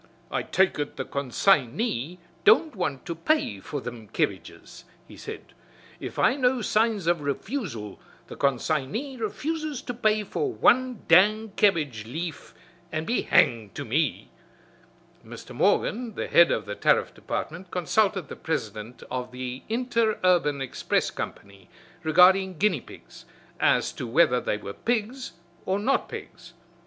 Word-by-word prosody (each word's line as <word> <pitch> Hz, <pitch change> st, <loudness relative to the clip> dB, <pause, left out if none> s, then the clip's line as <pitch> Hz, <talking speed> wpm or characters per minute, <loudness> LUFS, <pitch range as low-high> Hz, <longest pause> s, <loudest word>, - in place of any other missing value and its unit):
"I -, -, 0 dB
take 190 Hz, -4 st, +1 dB
ut 145 Hz, -, -3 dB
the -, -, -4 dB
con 140 Hz, -2 st, -4 dB
sign 135 Hz, -4 st, +3 dB
y 180 Hz, -, -2 dB, 0.3 s
don't 335 Hz, -, +5 dB
want 155 Hz, -9 st, -3 dB
to 170 Hz, -, -3 dB
pay 165 Hz, -, 0 dB
for 145 Hz, +9 st, -5 dB
thim 120 Hz, -4 st, -8 dB
kebbages," -, -, -4 dB, 0.2 s
he -, -, -13 dB
said. -, -, -9 dB, 0.5 s
"If -, -, -7 dB
I 250 Hz, -, +4 dB
know 255 Hz, -3 st, +1 dB
signs 215 Hz, -4 st, +1 dB
of 170 Hz, -2 st, +2 dB
refusal, 140 Hz, -, -4 dB, 0.3 s
the -, -, -10 dB
con 140 Hz, -2 st, +2 dB
sign 140 Hz, 0 st, -2 dB
y 270 Hz, +3 st, -4 dB
refuses 300 Hz, +6 st, -3 dB
to 245 Hz, -, -4 dB
pay 215 Hz, -2 st, +1 dB
for 395 Hz, -, -2 dB
wan 255 Hz, -, +2 dB
dang 210 Hz, +6 st, +5 dB
kebbage 150 Hz, -, +2 dB
leaf 165 Hz, +2 st, -6 dB, 0.4 s
an' 155 Hz, 0 st, -2 dB
be 235 Hz, -, +1 dB
hanged 110 Hz, -4 st, +2 dB
to -, -, -5 dB
me!" 140 Hz, +4 st, -1 dB, 0.9 s
Mr. -, -, -11 dB
Morgan, 235 Hz, -1 st, +1 dB
the -, -, -3 dB
head 170 Hz, 0 st, +6 dB
of 105 Hz, -, -1 dB
the 105 Hz, -, -5 dB
Tariff -, -, +2 dB
Department, 175 Hz, +4 st, -5 dB
consulted 190 Hz, 0 st, +1 dB
the -, -, -8 dB
president 110 Hz, -6 st, -4 dB
of 125 Hz, 0 st, -3 dB
the 125 Hz, 0 st, -6 dB
Interurban 215 Hz, -, +1 dB
Express 130 Hz, -, -1 dB
Company 100 Hz, -2 st, -8 dB, 0.3 s
regarding 180 Hz, +3 st, +5 dB
guinea 180 Hz, -7 st, +2 dB
pigs, -, -, -14 dB, 0.3 s
as -, -, +3 dB
to 125 Hz, -, -6 dB
whether 125 Hz, -1 st, +3 dB
they 105 Hz, -, -1 dB
were 100 Hz, -1 st, -7 dB
pigs 235 Hz, -, -2 dB, 0.3 s
or 190 Hz, -, +1 dB
not 260 Hz, +7 st, 0 dB
pigs. 175 Hz, 0 st, -10 dB
175 Hz, 150 wpm, -26 LUFS, 130-220 Hz, 0.9 s, head